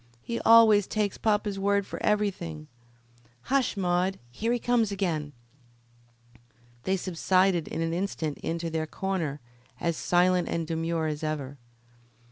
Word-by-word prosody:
He 235 - -3
always 220 -3 +6
takes 210 -2 -1
papa's 210 -2 0
word 200 0 +1
for - - -7
everything. 195 - -1 0.9
Hush, 265 -6 +2
Maude; 185 0 +1
here 225 - -2
he 245 - +2
comes 235 -3 +1
again." 165 -7 -2 1.5
They 190 +1 +1
subsided 185 -1 +1
in - - -4
an 165 0 -1
instant 170 -5 -3
into 165 0 -3
their 160 -1 -2
corner 165 -7 -3 0.4
as 170 -1 0
silent 180 +2 +2
and 165 -1 -1
demure 165 0 -1
as 150 0 -3
ever. 140 -3 -4
180 Hz, 130 wpm, -27 LUFS, 160-200 Hz, 1.5 s, always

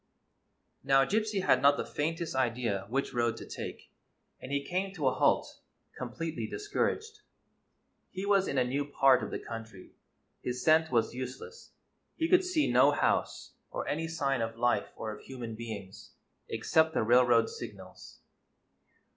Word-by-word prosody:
Now, 135 0 +4
Gypsy 215 0 0
had - - +4
not 140 +1 +5
the - - -2
faintest 165 +2 -2
idea 115 -6 -1
which 135 +4 -1
road 120 -1 0
to - - -8
take, - - -8 0.5
and 130 - -8
he 140 0 -1
came 190 +3 -2
to 150 -6 0
a 130 - +3
halt, - - +1 0.4
completely 155 +6 -4
discouraged. 420 +1 -2 0.9
He 190 +1 -5
was 200 -1 +3
in 140 - -2
a 130 - +4
new 135 +4 -1
part 135 -2 +4
of - - -4
the - - -3
country; 115 -4 -9 0.5
his 125 0 -4
scent 160 0 +4
was 115 -2 +1
useless; 130 - -8 0.4
he 325 - 0
could 365 +1 +5
see 360 -5 +1
no - - +6
house, - - 0 0.2
or - - -4
any 165 +2 -1
sign 140 -6 -1
of 115 0 -3
life 120 +1 +1
or 110 - -5
of 105 - -9
human 120 -4 -7
beings, 110 -4 -8 0.4
except 160 +8 +2
the - - +2
railroad 120 0 +5
signals. 95 -3 -10
135 Hz, 155 wpm, -30 LUFS, 115-165 Hz, 0.9 s, no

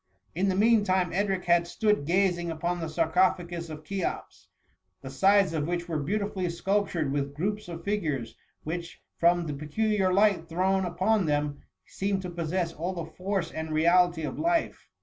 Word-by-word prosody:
In 190 +4 +1
the 185 - +1
mean 220 +2 +4
time, 185 -3 +1
Edric 195 0 0
had 170 0 +3
stood 210 -4 0
gazing 175 -1 +1
upon 170 +2 -2
the 165 -1 -4
sarcophagus 170 +1 +1
of 155 0 -8
Cheops, 195 +4 -4 0.5
the - - -8
sides 195 -2 +4
of 155 -2 -1
which 175 0 -2
were 160 -3 -2
beautifully 195 +3 -2
sculptured 175 -4 -1
with 140 0 -2
groups 205 +6 -2
of 170 -1 -7
figures, 155 - -2 0.3
which, 170 +2 -5 0.2
from 175 0 +3
the 150 - -3
peculiar 190 +7 0
light 195 -4 +3
thrown 190 +3 +1
upon 185 +2 +1
them, 145 -1 -1 0.2
seemed 195 -1 -2
to 180 - -5
possess 170 0 -2
all 175 +4 -3
the 170 -3 -6
force 190 -2 -2
and 160 0 -5
reality 170 +1 +3
of 150 - -4
life. 335 +1 0
175 Hz, 170 wpm, -28 LUFS, 160-195 Hz, 0.5 s, mean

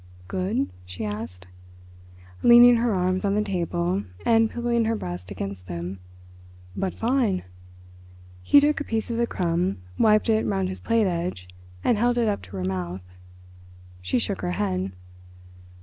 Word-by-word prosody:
"Good?" 200 +9 -1
she 90 +3 -6
asked, 105 -3 -6 1.0
leaning 240 0 +8
her 235 0 +1
arms 185 -1 0
on 200 0 +1
the 210 - +2
table 175 - -1 0.2
and 225 -1 +4
pillowing 235 -1 0
her 225 +1 +1
breast 90 - -6
against 95 -2 -6
them. 90 +2 -5 0.8
"But 190 - -2
fine!" 230 -5 +1 1.0
He 190 - +6
took 295 0 +2
a - - -1
piece 225 -3 -2
of 230 - -2
the 235 0 +1
crumb, 170 - 0 0.2
wiped 215 0 +4
it 220 -1 +3
round 190 -2 0
his 185 - -6
plate 230 -2 +2
edge, 170 - -3 0.4
and 225 - +2
held 245 +1 +2
it 235 -2 +2
up 205 -1 0
to 95 +2 -11
her 90 - -2
mouth. 90 -1 -3 1.0
She 90 0 0
shook - - -2
her 90 - -2
head. 95 0 -1
185 Hz, 155 wpm, -25 LUFS, -, 1.0 s, leaning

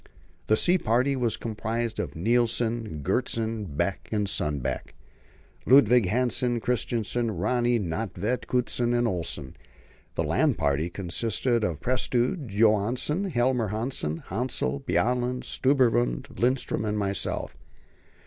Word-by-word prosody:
The 110 - +4
sea 180 +1 +3
party 125 +3 +2
was 120 -4 0
composed 115 +1 -3
of - - -3
Nilsen, 115 -3 0
Gjertsen, 110 - -1
Beck, 95 - -1
Sundbeck, 95 - -2 0.7
Ludvig 125 -5 +6
Hansen, 120 +2 +1
Kristensen, 120 0 -1
Rönne, 120 +5 +1
Nödtvedt, 105 +6 -2
Kutschin, 120 -1 +1
and 120 0 +2
Olsen. 85 - -4 0.6
The - - 0
land - - +2
party 70 +4 0
consisted 110 +6 -1
of 85 -6 -2
Prestrud, 125 +3 0
Johansen, 115 - +2
Helmer 125 - +1
Hanssen, 105 - -3
Hassel, 95 - -2
Bjaaland, 125 - 0
Stubberud, 120 - +2
Lindström, 125 -1 0
and 105 -1 -1
myself. 100 -2 -2
115 Hz, 110 wpm, -27 LUFS, 100-125 Hz, 0.7 s, Ludvig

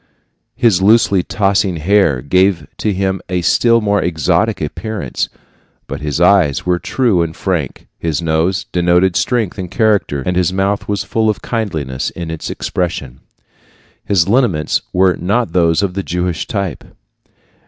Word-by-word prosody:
His 105 -7 +3
loosely 100 -2 +4
tossing 100 -1 0
hair 80 -5 +2
gave 90 +1 +2
to 105 - 0
him 95 0 -1
a 90 -1 -1
still 115 +7 +3
more 100 -2 +1
exotic 80 -6 0
appearance; 110 -2 -4 0.6
but - - -6
his 75 0 -2
eyes 90 -5 +3
were 90 -1 +1
true 115 -7 +1
and 85 -1 -3
frank, 85 -9 -3
his 80 -3 -1
nose 85 +3 0
denoted 90 +1 +2
strength 110 -5 0
and 90 -2 -5
character, 100 - +1
and 90 - -1
his 90 -1 +1
mouth 95 +2 -1
was 105 0 -1
full 110 +1 0
of 105 - -2
kindliness 80 - -3
in 85 -2 -6
its 80 - -5
expression. 75 -8 -3 0.8
His 95 -4 +2
lineaments 100 - +1
were 90 0 +3
not 105 +7 -1
those 85 0 +2
of 95 -2 -1
the 100 - -2
Jewish 90 -2 -3
type. 100 - -3
90 Hz, 150 wpm, -16 LUFS, 85-100 Hz, 0.8 s, loosely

